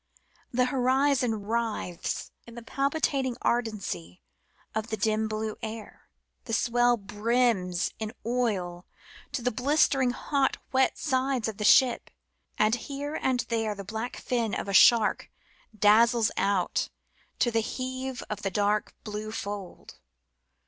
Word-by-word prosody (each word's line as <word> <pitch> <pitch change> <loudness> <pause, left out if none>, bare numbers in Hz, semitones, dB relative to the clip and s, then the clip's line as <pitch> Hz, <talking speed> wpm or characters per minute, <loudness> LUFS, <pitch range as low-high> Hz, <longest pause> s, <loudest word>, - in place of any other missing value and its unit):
The 250 +1 +2
horizon 255 -3 +1
writhes 220 -5 -3 0.2
in 235 - -12
the 235 - -8
palpitating 275 0 0
ardency 210 - -2 0.5
of 220 0 -2
the 220 - -3
dim 215 +1 +1
blue 215 0 -3
air; 220 0 -8 0.4
the 225 - -5
swell 240 +1 +3
brims 210 -4 0
in 220 -1 -3
oil 200 -8 -1 0.4
to 245 - -3
the 250 - +1
blistered 265 0 +2
hot 275 +2 0
wet 265 0 +2
sides 260 -4 0
of 220 -3 -5
the 210 - -3
ship, 250 +3 +5 0.5
and 215 +1 +3
here 280 +4 -4
and 255 -2 +1
there 225 -2 -2
the 200 - -7
black 220 +5 -5
fin 235 -4 -1
of - - -4
a 200 - -3
shark 225 +2 +5 0.5
dazzles 225 +2 +5
out 195 -3 0 0.5
to 240 - +2
the 225 - +2
heave 260 +2 -4
of 210 -1 -5
the 195 - -1
dark 205 +2 0
blue 215 0 -5
fold. 200 -3 -7
230 Hz, 135 wpm, -28 LUFS, 210-255 Hz, 0.5 s, ship